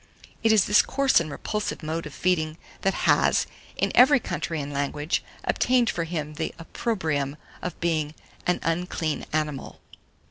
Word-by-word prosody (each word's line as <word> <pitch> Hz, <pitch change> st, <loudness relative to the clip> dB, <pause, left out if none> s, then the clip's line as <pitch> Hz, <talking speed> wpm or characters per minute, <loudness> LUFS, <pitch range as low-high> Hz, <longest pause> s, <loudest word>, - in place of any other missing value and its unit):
It 225 Hz, -, +4 dB
is 215 Hz, -4 st, +5 dB
this 210 Hz, -, +6 dB
coarse 275 Hz, -1 st, +3 dB
and 165 Hz, -2 st, -3 dB
repulsive 210 Hz, +5 st, -3 dB
mode 160 Hz, +1 st, -3 dB
of 150 Hz, -, -10 dB
feeding 160 Hz, -3 st, +1 dB, 0.2 s
that 195 Hz, -, +1 dB
has, -, -, +4 dB, 0.3 s
in -, -, +1 dB
every 270 Hz, +2 st, +7 dB
country 170 Hz, -5 st, -3 dB
and 145 Hz, 0 st, -4 dB
language, 145 Hz, +3 st, -1 dB, 0.2 s
obtained 245 Hz, -2 st, +2 dB
for 170 Hz, -, -2 dB
him 155 Hz, -3 st, -4 dB
the 160 Hz, +1 st, -3 dB
opprobrium 160 Hz, -, -2 dB, 0.2 s
of 180 Hz, -2 st, -5 dB
being 155 Hz, -3 st, 0 dB, 0.3 s
"an 180 Hz, -, +2 dB
unclean 165 Hz, -2 st, -1 dB
animal." 150 Hz, -3 st, -2 dB
165 Hz, 150 wpm, -26 LUFS, 150-190 Hz, 0.3 s, every